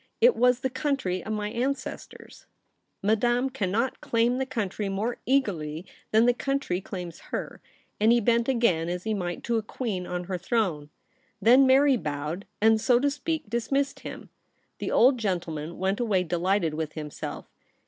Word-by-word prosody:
It 485 +1 +6
was 250 0 +3
the 260 - 0
country 255 - -1
of 220 - -5
my 210 -1 -2
ancestors.' 260 +3 -5 0.3
' - - -50
Madame 240 +5 +2
cannot 230 +1 -1
claim 235 +2 +1
the 265 - -1
country 210 -5 -2
more 210 +5 -2
eagerly 180 - 0 0.2
than 220 +2 +4
the 245 - +5
country 275 -8 -1
claims 180 -4 -7
her,' - - -5 0.4
and 215 +2 +5
he 240 - +5
bent 235 +2 +2
again 195 -10 +2
as 180 0 -3
he 220 - -1
might 175 -4 -3
to 235 -1 0
a - - 0
queen 215 -4 -4
on 180 0 -3
her 180 0 -4
throne. 175 -7 -1 0.5
Then 255 +4 +6
Mary 270 0 +5
bowed, 150 +3 -4
and, 220 0 +4
so 240 +1 +4
to 285 +2 +1
speak, 310 -1 -3
dismissed 275 +5 -1
him. - - -9 0.5
The - - -3
old 255 +1 +5
gentleman 170 -6 -3
went 190 +2 0
away 210 -6 +1
delighted 175 0 0
with 155 -1 -3
himself. 150 -2 -6
220 Hz, 170 wpm, -27 LUFS, 180-250 Hz, 0.5 s, It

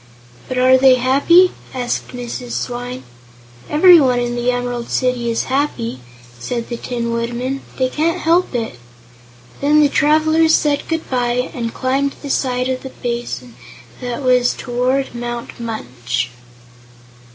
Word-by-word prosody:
"But 255 - -4
are 255 +1 +5
they 260 -1 +7
happy?" 280 +9 +4 0.2
asked 245 -1 -2
Mrs. 245 0 -6
Swyne. 245 +1 -4 0.7
"Everyone 300 -6 +6
in 240 0 -1
the 240 +1 0
Emerald 245 -1 -2
City 250 -2 0
is 230 - 0
happy," 255 - -2 0.4
said 235 - -4
the 235 - -4
Tin 235 -1 -3
Woodman. 240 +3 -2 0.2
"They 260 - +2
can't 325 +6 0
help 335 -3 +2
it." 225 - -3 0.8
Then 295 +2 +4
the 290 - +4
travelers 315 +2 +3
said 290 -1 0
good 325 -1 -2
bye, 250 0 0
and 230 -2 -3
climbed 270 +3 -1
the 285 - -3
side 250 -2 0
of 260 -1 -2
the 265 - -7
basin 240 0 -5 0.5
that 245 +2 -4
was 250 -1 +3
toward 255 +2 -1
Mount 240 0 -6
Munch. 125 - -3
250 Hz, 140 wpm, -18 LUFS, 240-275 Hz, 0.8 s, they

